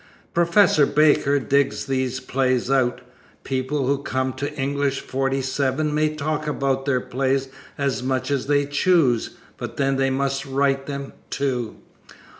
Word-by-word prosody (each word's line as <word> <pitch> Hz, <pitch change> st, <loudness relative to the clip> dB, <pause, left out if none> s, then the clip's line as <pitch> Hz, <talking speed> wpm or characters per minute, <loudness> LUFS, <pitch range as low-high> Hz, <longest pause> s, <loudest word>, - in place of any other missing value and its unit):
Professor 170 Hz, -3 st, +4 dB
Baker 145 Hz, -1 st, +3 dB
digs 140 Hz, +3 st, +1 dB
these 130 Hz, -2 st, -1 dB
plays 130 Hz, -1 st, 0 dB
out. 125 Hz, -2 st, +2 dB, 0.4 s
People 135 Hz, +1 st, -1 dB
who 140 Hz, +1 st, +1 dB
come 130 Hz, -1 st, -1 dB
to 140 Hz, +3 st, -4 dB
English 140 Hz, -1 st, -1 dB
47 135 Hz, +2 st, -1 dB
may 155 Hz, 0 st, +1 dB
talk 155 Hz, +1 st, -2 dB
about 135 Hz, -2 st, -1 dB
their 130 Hz, -2 st, +2 dB
plays 135 Hz, +1 st, -1 dB, 0.3 s
as 140 Hz, -2 st, -1 dB
much 130 Hz, +2 st, -1 dB
as 140 Hz, -2 st, -1 dB
they 145 Hz, 0 st, +2 dB
choose, 145 Hz, -5 st, +2 dB, 0.2 s
but -, -, -7 dB
they 135 Hz, -1 st, +1 dB
must 135 Hz, +1 st, -1 dB
write 135 Hz, 0 st, 0 dB
them, 140 Hz, -1 st, -5 dB, 0.2 s
too. 125 Hz, -5 st, -2 dB
135 Hz, 135 wpm, -23 LUFS, 130-145 Hz, 0.4 s, Professor